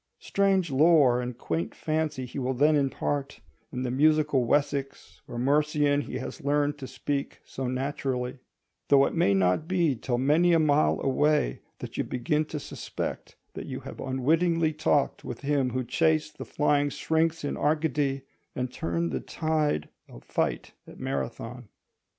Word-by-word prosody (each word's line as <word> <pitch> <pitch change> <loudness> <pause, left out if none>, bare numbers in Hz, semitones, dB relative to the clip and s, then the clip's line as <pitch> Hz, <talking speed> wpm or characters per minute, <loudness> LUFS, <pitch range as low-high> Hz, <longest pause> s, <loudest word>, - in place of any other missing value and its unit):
Strange 195 -4 +1
lore 140 -4 +5
and 125 -1 -5
quaint 85 -5 -3
fancy 155 -4 -2
he 125 +3 -6
will 130 0 -1
then 150 +4 +4
impart, 140 0 -1 0.3
in 130 -3 -3
the 125 - -2
musical 150 -1 +3
Wessex 140 +1 -1
or 120 - -7
Mercian 145 +2 +2
he - - -5
has - - -6
learned 145 +1 +1
to 130 - -6
speak 140 +1 -3
so 130 -1 -5
naturally; 130 -1 -2 0.5
though 140 -1 +6
it - - -2
may 130 - +3
not 95 - +2
be 170 -6 +2
till 120 +1 -2
many 155 +7 +3
a 165 - +5
mile 150 -1 +3
away 140 - +1 0.2
that - - -8
you - - +1
begin 150 +5 -1
to 150 0 -5
suspect - - -6 0.2
that - - -7
you - - -5
have - - -9
unwittingly 160 +5 +1
talked 150 -2 +1
with 120 - -7
him 140 -2 +1
who 130 +1 -2
chased 155 +4 0
the - - -5
flying 145 -1 +1
Syrinx 160 +2 0
in 145 - -2
Arcady 145 -3 0 0.3
and 125 0 -3
turned 85 0 -2
the 65 - -1
tide 155 - -1 0.2
of - - -13
fight - - -2
at - - -13
Marathon. 125 -2 -4
145 Hz, 160 wpm, -27 LUFS, 125-155 Hz, 0.5 s, though